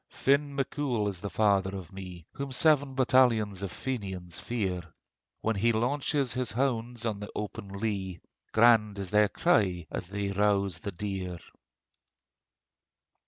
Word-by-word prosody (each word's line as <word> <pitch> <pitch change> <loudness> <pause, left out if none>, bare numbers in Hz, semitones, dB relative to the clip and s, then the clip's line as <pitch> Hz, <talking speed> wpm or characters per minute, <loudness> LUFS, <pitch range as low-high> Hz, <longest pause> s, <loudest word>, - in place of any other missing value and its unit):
Finn 140 +1 +1
Mac 135 -2 -1
Cool 125 -8 0
is 95 -3 -6
the 100 - -4
father 100 -3 +2
of 90 -4 -9
me, 90 -3 -9
Whom 140 -1 -5
seven 145 0 +3
battalions 120 -7 +3
of 100 -2 -4
Fenians 95 -9 -5
fear. 95 -7 -2 0.6
When 110 0 0
he 115 +4 +3
launches 135 +3 0
his 125 -2 -1
hounds 120 -2 -1
on 105 -3 -1
the 105 - -7
open 100 -1 -5
lea, 100 -3 -3 0.3
Grand 110 -2 +5
is 95 -2 -5
their 105 -1 +4
cry 95 - +2
as - - -4
they 100 +1 -3
rouse 100 -3 +1
the 100 - -5
deer. 95 -1 -4
105 Hz, 145 wpm, -29 LUFS, 95-125 Hz, 0.6 s, Grand